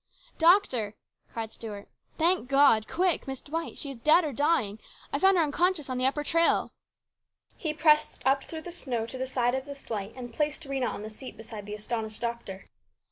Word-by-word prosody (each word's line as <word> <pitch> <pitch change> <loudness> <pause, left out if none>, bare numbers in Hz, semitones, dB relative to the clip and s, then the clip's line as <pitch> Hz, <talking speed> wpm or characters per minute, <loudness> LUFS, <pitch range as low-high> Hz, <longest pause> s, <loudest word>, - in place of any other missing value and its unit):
" - - -27
Doctor! 250 - +3 0.2
" - - -39
cried 225 -1 -4
Stuart. 210 -3 -8 0.2
" - - -38
Thank 340 -5 +2
God! 275 -6 +5
Quick! 360 -4 +1
Miss 265 -1 -4
Dwight! 325 +3 -5
She 280 - -2
is 270 - -9
dead 305 +9 +5
or 300 -3 -3
dying! 250 -7 +1 0.3
I - - +1
found 385 0 +5
her 335 - +4
unconscious 310 -1 0
on 255 - -2
the 255 - +4
upper 295 +2 0
trail! 330 +3 +3 0.4
" - - -60 0.3
He 315 - -3
pressed 305 0 +3
through 275 +4 0
the 350 - -8
snow 255 -9 -2
up 225 - -7
to 260 - -7
the 260 - -2
side 245 -1 +1
of 265 0 -2
the 285 -1 -7
sleigh, 215 -6 -5
and 245 -2 -8
placed 300 +4 -1
Rhena 270 -2 -1
on 205 - -6
the 215 - -7
seat 255 +4 -10
beside 220 -2 -8
the 210 - -4
astonished 220 0 -3
doctor. 235 -5 -5
265 Hz, 215 wpm, -28 LUFS, 230-310 Hz, 0.4 s, God